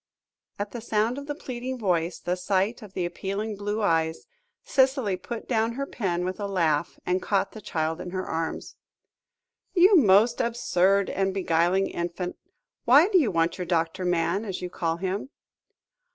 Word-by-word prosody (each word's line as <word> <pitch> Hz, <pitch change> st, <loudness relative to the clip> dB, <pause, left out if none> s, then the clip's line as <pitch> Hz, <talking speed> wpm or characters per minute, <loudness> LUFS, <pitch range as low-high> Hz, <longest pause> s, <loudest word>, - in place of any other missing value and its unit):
At 205 Hz, 0 st, -4 dB
the 240 Hz, -, -6 dB
sound 225 Hz, +3 st, 0 dB
of 285 Hz, -, -9 dB
the 290 Hz, -, -3 dB
pleading 255 Hz, -2 st, -5 dB
voice, 175 Hz, -6 st, 0 dB
the 180 Hz, -, -2 dB
sight 195 Hz, +5 st, 0 dB
of 205 Hz, -3 st, -12 dB
the 180 Hz, -, -1 dB
appealing 195 Hz, +5 st, -3 dB
blue 205 Hz, +2 st, -2 dB
eyes, 160 Hz, -3 st, +1 dB, 0.4 s
Cicely 265 Hz, -7 st, +2 dB
put 225 Hz, +5 st, -7 dB
down 225 Hz, -1 st, +1 dB
her 275 Hz, +3 st, -3 dB
pen 180 Hz, -9 st, -2 dB
with 185 Hz, +2 st, -4 dB
a 205 Hz, -, -2 dB
laugh, 170 Hz, -5 st, 0 dB
and 180 Hz, +1 st, 0 dB
caught 195 Hz, -1 st, 0 dB
the 220 Hz, -, -10 dB
child 160 Hz, -2 st, -2 dB
in 180 Hz, -, -6 dB
her 185 Hz, +1 st, -3 dB
arms. 165 Hz, 0 st, -4 dB, 1.0 s
"You 375 Hz, +3 st, +7 dB
most 230 Hz, -, +5 dB
absurd 200 Hz, -5 st, +2 dB
and 195 Hz, 0 st, -1 dB
beguiling 180 Hz, +1 st, +2 dB
infant, 175 Hz, +1 st, -4 dB, 0.5 s
why 285 Hz, -, +6 dB
do 385 Hz, -4 st, +5 dB
you 270 Hz, -9 st, +2 dB
want 165 Hz, -1 st, 0 dB
your 180 Hz, -, -2 dB
doctor 170 Hz, +2 st, 0 dB
man, 180 Hz, +3 st, +1 dB
as 195 Hz, -4 st, -4 dB
you 180 Hz, -1 st, -6 dB
call 165 Hz, -2 st, -1 dB
him?" 190 Hz, +7 st, -3 dB
195 Hz, 170 wpm, -26 LUFS, 175-230 Hz, 1.0 s, You